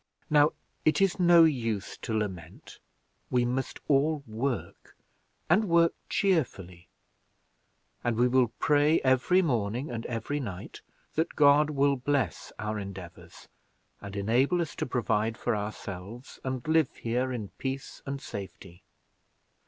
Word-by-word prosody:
Now 150 0 +5 0.3
it 155 -1 +3
is 195 -1 +2
no 175 -1 +7
use 115 -10 0
to 115 - -6
lament 95 -6 -6 0.5
we 125 -1 +2
must 130 +2 -2
all 145 +1 +2
work, 120 +4 -4 0.5
and 195 +7 +4
work 170 0 +4 0.2
cheerfully; 95 - -1 1.2
and 120 -2 0
we 120 +1 +4
will 125 0 +3
pray 150 +1 +3
every 130 +8 +3
morning 120 - -1
and 115 -1 -4
every 120 +5 -3
night 100 -9 -7 0.3
that 160 +2 -1
God 145 +1 +5
will 140 -1 +2
bless 130 - -1
our 105 0 -3
endeavors 90 -4 -10 0.5
and 100 0 -8
enable 120 - +2
us 165 -5 -2
to - - -2
provide 115 -2 0
for 120 - -1
ourselves, 105 +3 -7
and 130 0 -4
live 160 -3 +2
here 125 +3 -1
in 110 -6 -4
peace 135 0 -5
and 140 0 -3
safety. 95 -5 -9
125 Hz, 130 wpm, -28 LUFS, 105-145 Hz, 1.2 s, no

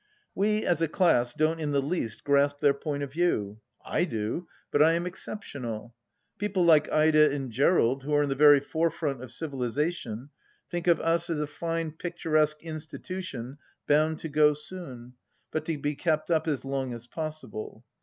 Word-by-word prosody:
We, 210 +2 +1
as 170 -2 +1
a 165 - +3
class, 155 -8 +3
don't 155 +3 +1
in 150 -2 -2
the 140 - +3
least 135 -6 -2
grasp 140 0 +2
their 140 -1 +4
point 145 0 -3
of 140 - -5
view. 110 - 0 0.3
I 175 - +1
do; 115 +5 -3 0.2
but 145 - +3
I 160 +2 +6
am 170 +1 -1
exceptional. 120 - -6 0.5
People 200 -3 +1
like 155 -3 +5
Ida 155 -1 +5
and 135 -3 -3
Gerald, 135 0 +3
who 145 +3 -5
are 145 - +4
in 145 - -1
the - - +1
very 145 +1 +7
forefront 160 -3 -1
of 130 -3 -9
civilization, 135 -2 -3 0.4
think 175 -1 -3
of 170 - +5
Us 165 +1 +1
as 165 - 0
a 150 - 0
fine 165 +2 -3
picturesque 155 -2 0
institution 155 -4 -6 0.3
bound 155 +2 +3
to - - -4
go 150 0 +4
soon, 140 -7 -8 0.4
but 155 0 -2
to 160 -2 -2
be 145 +1 -1
kept 155 +2 -1
up 160 -1 +2
as 145 -4 -1
long 135 -2 -2
as 120 0 -9
possible. 150 -5 -6
150 Hz, 175 wpm, -28 LUFS, 135-165 Hz, 0.5 s, very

